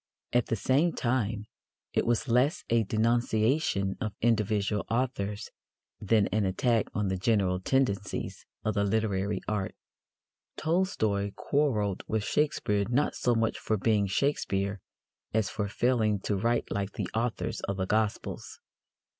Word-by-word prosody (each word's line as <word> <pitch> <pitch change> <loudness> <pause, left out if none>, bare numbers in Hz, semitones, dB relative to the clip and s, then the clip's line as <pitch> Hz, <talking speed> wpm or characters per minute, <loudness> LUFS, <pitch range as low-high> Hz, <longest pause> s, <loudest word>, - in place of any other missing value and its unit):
At 120 -1 +3
the - - 0
same 140 - +2
time, 115 -4 -1 0.5
it - - +1
was 120 +2 +1
less 125 +6 +2
a 115 -1 +4
denunciation 110 0 +1
of 105 -2 -3
individual 105 -2 +1
authors 115 -4 -2 0.5
than 105 0 +3
an 105 0 +1
attack 110 +4 +1
on 105 -2 0
the 95 - -1
general 95 -2 +2
tendencies 105 -2 -1 0.2
of 110 - +1
the 100 - +1
literary 100 -2 0
art. 105 -3 -2 0.8
Tolstoy 110 - 0
quarrelled 110 -10 0
with 110 -1 0
Shakespeare 105 -8 +1
not 135 +5 +2
so 120 -1 +1
much 115 0 0
for 110 - 0
being 105 -1 +2
Shakespeare 100 -4 0 0.6
as 110 -2 +1
for 105 -1 -2
failing 110 -2 +1
to 105 - -1
write 115 +5 0
like 100 0 -2
the - - -3
authors 115 +1 -1
of 100 - -2
the 95 - 0
Gospels. 105 +1 -2
110 Hz, 140 wpm, -29 LUFS, 100-120 Hz, 0.8 s, a